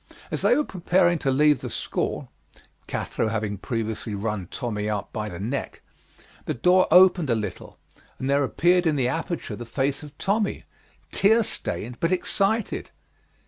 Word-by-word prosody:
As - - -2
they - - +4
were 300 - +2
preparing 175 - +2
to 135 - 0
leave 150 +2 +4
the - - -4
school - - -3 0.6
[Cathro - - -2
having 110 -2 -2
previously 110 -2 -3
run 100 -3 -3
Tommy 105 -3 -3
out 105 -2 -3
by 105 -1 -3
the 85 -3 -7
neck], 120 +8 -4 0.6
the - - -2
door 180 +8 +4
opened 180 -3 +6
a 115 - +3
little 105 -5 -5 0.4
and 130 - -4
there 140 +1 +3
appeared 175 +5 +3
in 155 - +2
the 130 -3 +1
aperture 160 -4 -3
the 120 - -7
face 135 +4 -1
of 150 -1 -12
Tommy, 205 +1 0 0.5
tear 220 +4 +4
stained 125 - -4
but 165 - +1
excited. 200 +4 0
140 Hz, 160 wpm, -25 LUFS, 110-180 Hz, 0.6 s, opened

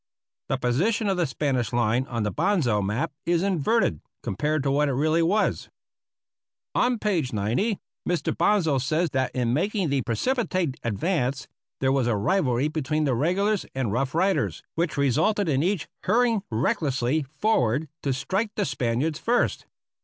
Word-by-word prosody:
The 135 - +1
position 180 - +1
of 190 - +1
the 175 -3 +1
Spanish 130 -3 -1
line 120 +2 +1
on 115 -3 -2
the 105 - -1
Bonsal 150 - +1
map 105 +7 -1
is 170 +1 +1
inverted 195 - +1 0.2
compared 150 +7 -1
to 135 - +1
what 145 +1 +2
it - - 0
really 155 +5 +2
was. 200 +6 +1 1.0
On 245 0 +2
page 180 - 0
90 120 - 0 0.3
Mr. 175 -2 0
Bonsal 170 -6 +2
says 155 +5 0
that 130 -1 0
in 120 -2 +1
making 195 - 0
the 140 -1 +1
"precipitate 185 - -1
advance" 135 - -1 0.3
there 130 0 +3
was 135 -3 +1
a 120 - +2
rivalry 130 - +1
between 155 0 -1
the 140 -3 +1
regulars 185 - +1
and 130 -6 -1
Rough 130 +5 -1
Riders, 190 +3 +1
which 165 -2 -1
resulted 180 - +2
in 140 -3 +2
each 180 0 0 0.2
hurrying 230 +1 +3
recklessly 135 +3 0
forward 150 - +1
to 140 - -1
strike 195 - -1
the - - 0
Spaniards 130 +4 -1
first. 240 +5 0
150 Hz, 155 wpm, -25 LUFS, 125-185 Hz, 1.0 s, there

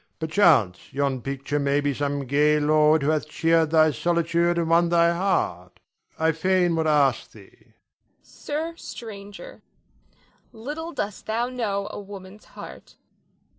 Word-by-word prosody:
Perchance 160 - +2
yon 135 -2 -1
picture 140 +3 -3
may 140 0 +1
be 145 -1 -1
some 140 0 -3
gay 150 +3 +2
lord 150 0 +3
who 150 - +2
hath 155 -1 -2
cheered 165 0 +2
thy 155 -1 +4
solitude 170 +4 0
and 170 -1 0
won 170 +1 +3
thy 170 0 +3
heart. 90 - -2 0.4
I 160 0 +2
fain 175 +1 +1
would 160 -1 0
ask 145 -3 +2
thee. - - -16
Nina. - - -28 0.5
Sir 315 +3 -5
stranger, 210 - -10 0.9
little 295 +9 -7
dost 205 - -5
thou 230 +3 -1
know 205 -6 -3
a - - -7
woman's 200 0 -11
heart. - - -12
165 Hz, 140 wpm, -24 LUFS, 145-200 Hz, 0.9 s, thy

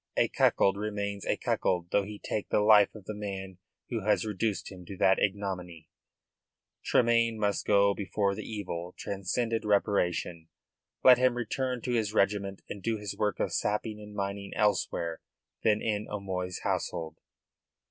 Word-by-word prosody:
A - - +3
cuckold 100 0 +3
remains 100 -1 -3
a - - +1
cuckold 90 -1 0
though 100 - +4
he 105 0 -7
take 105 0 -4
the - - +3
life 105 -1 +6
of 105 -3 -11
the 110 - -4
man 95 -3 -6 0.3
who 115 - 0
has 105 +2 +2
reduced 105 0 -2
him 90 -2 -10
to 95 - -7
that 95 0 +4
ignominy. 95 -4 -3 0.9
Tremayne 115 -1 +3
must 105 -2 -1
go 100 -1 +5
before 100 0 -1
the 105 - -5
evil 90 -5 -5
transcended 110 +4 -2
reparation. 90 -5 0 0.6
Let 125 -1 +8
him 125 -1 +3
return 125 +1 -2
to 125 - -2
his 110 -3 0
regiment 100 -1 +1
and 100 - -7
do 115 +2 -1
his 105 -2 -5
work 105 -1 -1
of - - -1
sapping 105 +1 -1
and 105 0 -11
mining 100 0 -4
elsewhere 85 -5 0 0.4
than 105 -1 +3
in 105 -1 -1
O'Moy's 95 -3 -4
household. 80 -1 -2
100 Hz, 160 wpm, -29 LUFS, 95-110 Hz, 0.9 s, Let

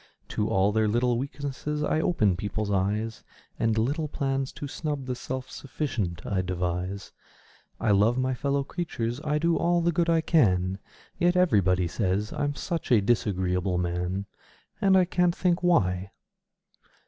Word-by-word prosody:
To 105 0 -1
all 95 +2 +3
their 110 0 +2
little 120 +2 +1
weaknesses 145 +2 -4
I 155 +1 +1
open 105 - +2
people's 105 +2 -3
eyes 105 +4 -1 0.4
And 115 -1 +1
little 145 +8 0
plans 135 -2 -2
to 145 - -6
snub 145 -1 -4
the 125 - -2
self 130 +1 -5
sufficient 115 - -4
I 95 -2 0
devise; 90 +2 -3 0.7
I 110 - +1
love 105 +5 +4
my 130 0 +1
fellow 140 +2 0
creatures 135 -6 -3
I 150 0 +1
do 165 +2 +2
all 175 0 +2
the 170 0 +2
good 170 0 +1
I 165 -1 +3
can 95 - +2 0.4
Yet 175 +1 +3
everybody 95 - +3
say 95 +1 0 0.2
I'm 145 0 -1
such 165 -4 -4
a 120 - +7
disagreeable 95 -4 0
man! 90 +2 -2 0.6
And 195 -2 +5
I 185 - +5
can't 175 0 +1
think 180 -1 +1
why! 95 - +2
120 Hz, 155 wpm, -27 LUFS, 95-150 Hz, 0.7 s, a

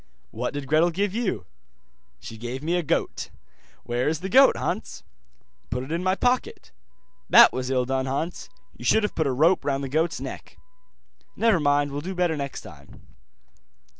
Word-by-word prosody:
'What - - -4
did 145 -1 -4
Gretel 155 +5 +3
give 195 +3 -1
you?' 215 - -2 0.7
'She 115 - -9
gave 120 +4 -6
me 165 +3 -1
a 175 - +1
goat.' 155 - -2 0.5
'Where 120 +2 -1
is 160 +1 -3
the 190 - -4
goat, 265 +6 +6
Hans?' - - -4 0.7
'Put 125 +1 -2
it 135 - -9
in 170 +1 -1
my 185 0 +2
pocket.' 250 +4 -1 0.6
'That - - +8
was 130 0 -3
ill 130 -1 +1
done, 130 +1 -1
Hans, 155 +7 -4 0.3
you - - -12
should 220 - +3
have 210 - -1
put 160 -3 0
a - - +1
rope 160 +8 +3
round 140 -1 -1
the 135 - -4
goat's 160 +4 0
neck.' - - -8 0.8
'Never 225 -6 +3
mind, 145 -1 +2
will 145 +1 -4
do 185 +4 -5
better 175 -3 +1
next 140 -2 -5
time. 70 -4 -15
150 Hz, 180 wpm, -25 LUFS, 130-180 Hz, 0.8 s, That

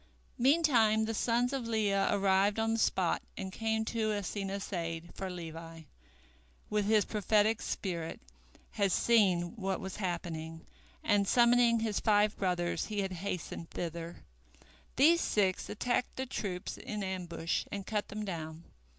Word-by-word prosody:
Meantime 240 -6 +4
the 225 - -2
sons 240 +3 +1
of 260 -4 -2
Leah 205 -3 +1
arrived 200 +1 +3
on 225 0 +1
the 225 - 0
spot 185 -5 +1 0.2
and 190 -1 -4
came 220 +1 -1
to 220 -1 -1
Asenath's 200 -1 -3
aid, 165 -1 -4
for 190 - -5
Levi, 165 -2 -8 0.9
with 210 -1 +1
his 215 0 +4
prophetic 215 +1 +2
spirit, 170 -4 -3 0.5
had 200 -3 +1
seen 185 -5 +3
what 195 -2 -2
was 190 -1 -6
happening, 165 -4 -4 0.4
and 205 -2 +2
summoning 235 0 +5
his 220 -3 0
five 210 -1 +3
brothers 180 -2 -1
he 210 -2 -1
had 195 -1 -2
hastened 180 -2 -5
thither. 170 0 -6 0.7
These 330 +5 +5
six 190 -3 +1
attacked 245 +3 -1
the 260 - -3
troops 190 -8 -4
in 210 -2 -4
ambush 180 -3 -2
and 200 -1 -4
cut 210 0 -2
them 210 +1 -5
down. 160 -3 -6
200 Hz, 140 wpm, -32 LUFS, 180-220 Hz, 0.9 s, summoning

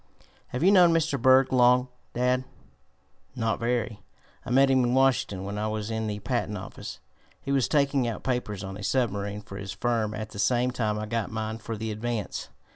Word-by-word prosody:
"Have 125 - -3
you 190 - +6
known 180 -4 +7
Mr. 155 -5 0
Berg 130 +1 +5
long, 125 0 +5 0.3
dad?" 125 +1 +2 0.9
"Not 115 -2 -1
very. 115 -2 -1 0.4
I - - -8
met 135 +2 +5
him 130 -1 +4
in 120 +1 +1
Washington 130 -8 +2
when 100 +1 -4
I 105 - -1
was 110 0 -3
in 110 0 -2
the 105 -1 -3
patent 105 - -2
office. - - -8 0.4
He 140 - -5
was 135 -3 +2
taking 140 -3 +2
out 115 - -4
papers 120 -6 -2
on 95 0 -6
a 105 - -8
submarine 105 -3 -1
for 100 -1 -9
his 100 0 -6
firm 110 0 -1
at 110 0 -6
the 100 - -8
same 125 +3 +2
time 110 -4 -1
I 105 - -3
got 115 0 -2
mine 110 0 -4
for 115 0 -5
the 110 +1 -3
Advance. 110 0 -4
115 Hz, 200 wpm, -27 LUFS, 105-130 Hz, 0.9 s, known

